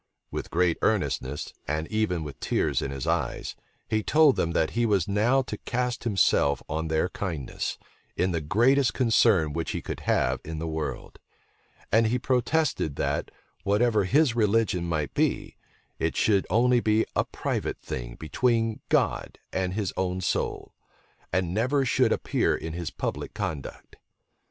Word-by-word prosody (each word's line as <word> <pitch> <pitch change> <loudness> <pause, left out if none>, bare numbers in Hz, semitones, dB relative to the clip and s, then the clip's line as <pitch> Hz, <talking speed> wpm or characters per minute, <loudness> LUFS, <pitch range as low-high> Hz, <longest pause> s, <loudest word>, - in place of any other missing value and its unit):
With - - -4
great 85 -1 +1
earnestness, 65 +3 -1
and 75 +2 -1
even 110 -7 0
with 75 -2 -8
tears - - 0
in - - -3
his 70 -2 -5
eyes, - - -1 0.3
he 110 -1 +1
told 150 +2 +5
them 85 - 0
that 80 - +1
he 120 - 0
was 100 -7 +2
now 115 +7 +2
to - - -6
cast 125 0 -2
himself 80 - +2
on 80 +1 -2
their 80 +2 +1
kindness, 85 -10 -4 0.4
in 90 +2 +1
the 85 -2 -1
greatest 120 - +3
concern 110 - +3
which 80 +1 -2
he - - -3
could - - -5
have - - +1
in 80 0 -6
the 80 +1 -3
world; 80 -1 -5 0.7
and 115 +1 +4
he 120 +3 +1
protested, 130 - 0
that, - - -1 0.3
whatever 105 0 +2
his 135 - +3
religion 105 -5 +2
might 75 -3 -1
be, - - 0 0.4
it 80 - -1
should 100 -3 +2
only 125 +2 +4
be 110 -1 +2
a - - +3
private - - -3
thing - - -6
between 115 - 0
God - - +1 0.2
and 95 -1 -1
his 105 -4 -2
own 95 0 -1
soul, 90 - -2 0.6
and 90 -1 0
never 130 +6 +1
should 120 - +3
appear - - +1
in 80 - -5
his 85 -1 -4
public - - -4
conduct. 85 -9 -5
100 Hz, 155 wpm, -27 LUFS, 80-115 Hz, 0.7 s, told